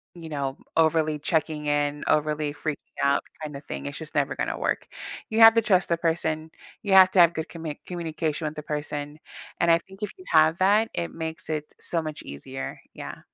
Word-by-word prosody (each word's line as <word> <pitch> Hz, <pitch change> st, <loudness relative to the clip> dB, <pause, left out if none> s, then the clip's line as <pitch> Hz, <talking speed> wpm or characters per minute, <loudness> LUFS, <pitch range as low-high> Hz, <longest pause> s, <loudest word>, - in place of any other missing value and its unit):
you 165 Hz, -2 st, -9 dB
know, 140 Hz, -3 st, -3 dB, 0.2 s
overly 160 Hz, -1 st, +3 dB
checking 155 Hz, -1 st, -1 dB
in, 145 Hz, 0 st, 0 dB
overly 150 Hz, -1 st, +1 dB
freaking 155 Hz, 0 st, -3 dB, 0.3 s
out 140 Hz, 0 st, +3 dB, 0.2 s
kind 150 Hz, -2 st, -5 dB
of 140 Hz, -, -8 dB
thing, 70 Hz, 0 st, -6 dB
it's 70 Hz, -, -5 dB
just -, -, -9 dB
never -, -, +1 dB
gonna -, -, -2 dB
work. -, -, -1 dB, 0.4 s
You 220 Hz, -, 0 dB
have 225 Hz, 0 st, +10 dB
to 230 Hz, -, +5 dB
trust 185 Hz, -4 st, +3 dB
the 170 Hz, -, +2 dB
person. 160 Hz, -1 st, -1 dB, 0.3 s
You 200 Hz, -, +1 dB
have 190 Hz, -1 st, +9 dB
to 190 Hz, -, +3 dB
have 170 Hz, -1 st, +7 dB
good 160 Hz, 0 st, -3 dB
commit 160 Hz, -3 st, -6 dB
communication 160 Hz, -3 st, -3 dB
with 150 Hz, -, -5 dB
the 150 Hz, -, -6 dB
person, 150 Hz, 0 st, -4 dB, 0.4 s
and 170 Hz, 0 st, +4 dB
I 165 Hz, -, +7 dB
think 190 Hz, +3 st, -16 dB
if 210 Hz, -, -2 dB
you 370 Hz, -, -14 dB
have 160 Hz, +1 st, +5 dB
that, 210 Hz, +4 st, +4 dB
it 85 Hz, -1 st, -3 dB
makes 160 Hz, 0 st, -6 dB
it 150 Hz, -1 st, -3 dB
so 170 Hz, -, -2 dB
much 155 Hz, -1 st, -6 dB
easier, 130 Hz, -, -7 dB
yeah. -, -, -8 dB
155 Hz, 205 wpm, -26 LUFS, 150-170 Hz, 0.4 s, have